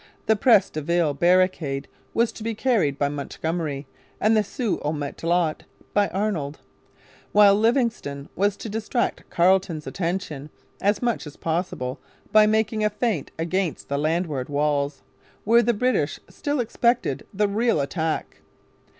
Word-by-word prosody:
The 220 - +4
Pres 205 -2 +4
de 155 - -4
Ville 170 -1 +1
barricade 175 -4 +2 0.3
was 230 0 +2
to - - -12
be 225 0 -2
carried 210 - +1
by 145 - +1
Montgomery 145 0 -3 0.3
and 220 +2 +3
the 215 - +4
Sault 225 0 -2
au 150 - 0
Matelot 160 +2 -1 0.3
by 205 -1 +3
Arnold, 180 -8 -2 0.7
while 205 -1 +7
Livingston 220 - 0
was 200 +1 +1
to - - -7
distract 220 +3 -2
Carleton's 175 -3 +2
attention 165 -5 -3 0.3
as 205 +4 +1
much 235 -9 -1
as 150 - -11
possible 160 -6 -2 0.3
by 215 0 +6
making 220 0 +1
a 210 - +3
feint 210 - -1
against 170 +1 -2
the 140 0 0
landward 155 -4 -1
walls, 145 -1 0 0.4
where 230 +2 +5
the 240 +1 +2
British 230 - 0
still 290 -1 -3
expected 240 +1 0
the 210 0 +1
real 220 -2 +1
attack. 160 +3 -2
185 Hz, 140 wpm, -24 LUFS, 150-215 Hz, 0.7 s, while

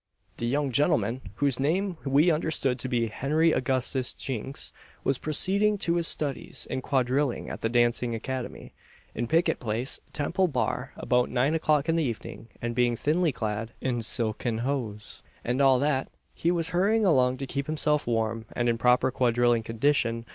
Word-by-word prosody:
The 120 - -2
young 140 +2 0
gentleman, 130 - +1
whose 140 -1 +1
name 180 +7 0
we 145 +5 +3
understood 150 -5 0
to 130 - -3
be 120 -2 +1
Henry 150 +8 +1
Augustus 130 -1 0
Jinks, 135 +1 -5 0.3
was 135 -2 0
proceeding 200 +7 +4
to 175 -3 0
his 170 -1 +1
studies 145 -3 -1
in 130 - -2
quadrilling 130 0 0
at - - -7
the 115 - 0
dancing 120 0 +1
academy, 130 +2 -6 0.4
in 120 +1 -3
Pickett 165 +6 +2
place, 115 +3 -1
Temple 170 +6 0
Bar, 130 -2 -2
about 125 -1 +1
nine 130 +4 +1
o'clock 155 -2 +1
in 165 - +2
the 165 -1 +1
evening; 115 -2 -5 0.2
and 120 0 -2
being 120 0 +2
thinly 160 +6 +1
clad, 110 -1 -4
in 125 -3 -1
silken 115 0 -1
hose, 115 -7 -4 0.2
and 125 +3 0
all 135 -2 +5
that, 135 0 0 0.2
he 170 - -1
was 170 -2 +1
hurrying 205 +6 +2
along 130 -7 +3
to 135 - -4
keep 140 +1 -4
himself 150 -2 0
warm 115 -1 -1
and 120 - -1
in 115 -1 0
proper 125 +2 +3
quadrilling 120 -2 +2
condition. 115 0 0
130 Hz, 170 wpm, -27 LUFS, 120-150 Hz, 0.4 s, all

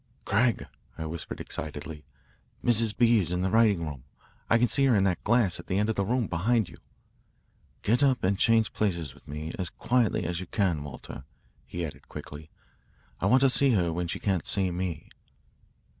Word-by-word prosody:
"Craig," 115 +2 +1 0.3
I 80 - -4
whispered 80 +1 -6
excitedly, 75 +1 -6 0.6
"Mrs. 115 -2 +4
B. 120 -2 +5
is 85 -3 -2
in 90 0 -1
the 95 - 0
writing 105 -6 +3
room 70 -5 -7 0.5
I 115 - +5
can 120 +1 +3
see 135 +4 +3
her 130 -4 +4
in 100 - +3
that 95 -2 0
glass 110 -5 +2
at - - -10
the 95 - -1
end 105 +2 +1
of 110 - 0
the 100 - 0
room, 120 +4 0
behind 105 +5 +1
you." - - -13 1.1
"Get 120 +5 +2
up 130 -4 +2
and 95 +2 +2
change 115 +2 +2
places 85 -9 -1
with - - -21
me 75 +2 -6
as 90 -3 -1
quietly 120 -6 0
as 85 0 -2
you 95 - -7
can, 90 -8 0
Walter," 75 - -9 0.4
he 85 - -5
said 75 - -7
quickly. 75 +1 -9 0.7
"I - - 0
want 130 +1 +5
to 135 - +6
see 135 0 +3
her 85 -5 +1
when 90 +1 -2
she - - -3
can't 95 -5 -1
see 95 -2 +1
me." 85 -3 -4
95 Hz, 195 wpm, -28 LUFS, 85-115 Hz, 1.1 s, to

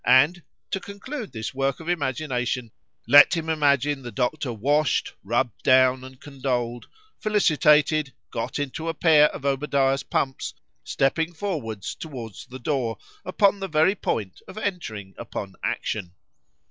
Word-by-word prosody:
—And, 145 +8 +5 0.3
to 195 - 0
conclude 200 - -7
this 110 +3 -5
work 135 0 -1
of 160 - -10
imagination,—let 135 -1 +2
him 160 -1 -3
imagine 145 -2 +2
the 120 -2 -7
doctor 130 +1 -1
washed,—rubbed 120 -2 0
down, 130 -1 +4
and 130 0 -12
condoled,—felicitated,—got 145 - 0
into 145 +3 -3
a 165 - -3
pair 155 -2 +6
of 140 - -8
Obadiah's 135 -1 +1
pumps, 135 -1 -2 0.3
stepping 160 +5 0
forwards 140 - -4
towards 125 -8 -8
the 130 0 -8
door, 125 -3 -1 0.3
upon 200 +2 +2
the 195 - -3
very 160 +3 +3
point 105 - -3
of 190 - -11
entering 115 - -4
upon 100 -4 -6
action. 90 -4 -3
140 Hz, 120 wpm, -25 LUFS, 125-160 Hz, 0.3 s, pair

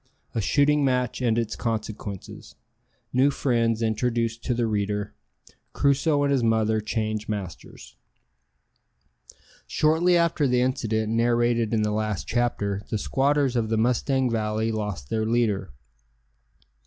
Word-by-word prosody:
A 115 - -1
shooting 145 +5 +3
match 125 -2 0
and 115 -2 +1
its 115 -2 -1
consequences 110 -4 -5 0.6
New 130 +3 +4
friends 115 -5 0
introduced 115 +1 -1
to 125 - 0
the 120 0 0
reader 105 -1 -2 0.6
Crusoe 145 +1 +2
and 140 - +1
his 135 -3 +2
mother 110 -1 +2
change 110 0 -3
masters. 90 - -7 1.7
Shortly 165 +3 +3
after 165 -4 +2
the 125 -1 +2
incident 110 -4 -1
narrated 120 -1 +2
in 110 -2 +1
the 105 - 0
last 105 -2 -2
chapter 105 -5 -1
the 110 - -1
squatters 135 +3 +1
of 115 -2 0
the 110 - +1
Mustang 125 +2 +1
Valley 110 0 -1
lost 105 -11 -4
their 110 -1 0
leader. 110 -7 0
115 Hz, 130 wpm, -25 LUFS, 110-125 Hz, 1.7 s, New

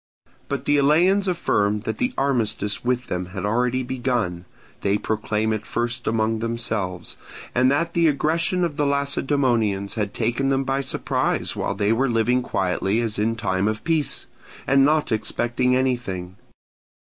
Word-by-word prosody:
But 140 -1 -3
the 145 - +3
Eleans 175 +8 +4
affirmed 105 - +1
that - - -4
the 250 0 +1
armistice 115 -6 0
with 125 0 0
them 90 0 -3
had 95 - -2
already 125 +4 +1
begun 120 -9 -2 0.4
(they 100 +1 +2
proclaim 110 +1 -1
it 110 0 -3
first 120 +1 -3
among 110 0 +1
themselves), 110 -6 -3 0.4
and 125 +1 +4
that 165 +5 0
the 170 -1 +3
aggression 165 +5 +1
of 155 -4 -2
the 145 -2 +2
Lacedaemonians 135 -8 +1
had 105 -3 -2
taken 120 +4 0
them 135 0 +1
by 135 +1 0
surprise 135 - -1
while - - -2
they 105 +2 +2
were 130 +3 +1
living 120 +2 +2
quietly 95 -1 0
as 115 -3 -2
in 115 +2 +1
time 100 -3 0
of 110 0 -2
peace, 160 -3 0 0.4
and 135 0 +4
not 150 0 +2
expecting 120 +3 0
anything. 120 -9 -2
120 Hz, 155 wpm, -23 LUFS, 105-140 Hz, 0.4 s, Eleans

